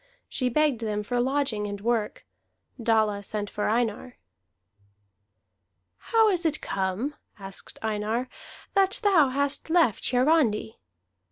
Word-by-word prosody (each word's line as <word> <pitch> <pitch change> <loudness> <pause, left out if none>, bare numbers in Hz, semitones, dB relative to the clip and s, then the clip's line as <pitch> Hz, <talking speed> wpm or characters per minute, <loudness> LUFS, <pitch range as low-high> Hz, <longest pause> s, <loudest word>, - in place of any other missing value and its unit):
She 255 -2 -1
begged 285 -2 +1
them 210 -2 -2
for 245 +3 -1
lodging 260 -5 0
and 205 0 -5
work. 225 0 -1 0.6
Dalla 220 -3 +2
sent 205 0 -5
for 210 - -1
Einar. 235 +2 -1 1.8
"How 450 -1 +3
is 360 -3 +1
it 305 -2 +1
come," 195 +9 -2 0.2
asked 195 -1 -9
Einar, 220 +3 -1 0.5
"that 390 0 +2
thou 350 -9 +5
hast 280 +3 0
left 320 - +3
Hiarandi?" 250 -5 +2
240 Hz, 115 wpm, -26 LUFS, 210-290 Hz, 1.8 s, thou